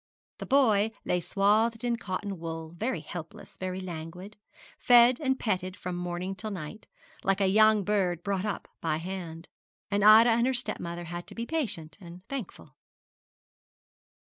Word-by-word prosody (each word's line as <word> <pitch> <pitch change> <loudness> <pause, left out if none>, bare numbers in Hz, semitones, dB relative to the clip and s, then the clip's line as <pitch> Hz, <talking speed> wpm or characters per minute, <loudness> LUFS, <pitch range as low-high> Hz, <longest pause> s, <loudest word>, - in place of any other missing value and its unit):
The - - -6
boy 225 -7 +4 0.2
lay 180 - +1
swathed 215 +6 +2
in 240 -1 +1
cotton 200 -3 -5
wool, 165 -1 -6
very 185 -3 -2
helpless, 175 +6 -9
very 185 0 -4
languid, 180 +3 -7 0.4
fed 245 0 +6
and 265 -3 0
petted 185 -3 -2
from 180 -2 -5
morning 175 +1 -3
till 215 +3 -6
night, 195 +2 -7 0.4
like 195 0 +1
a 195 - +3
young 215 +1 +5
bird 185 -4 0
brought 195 -1 -1
up 210 -3 -4
by 160 -2 0
hand: 170 -1 -6 0.4
and 200 0 +1
Ida 220 +3 +8
and 235 +2 +3
her 260 - +1
stepmother 175 -8 -3
had 175 +1 -7
to - - -11
be 235 - -3
patient 215 - -3
and 175 +1 -12
thankful. 230 - -7
195 Hz, 155 wpm, -28 LUFS, 175-220 Hz, 0.4 s, Ida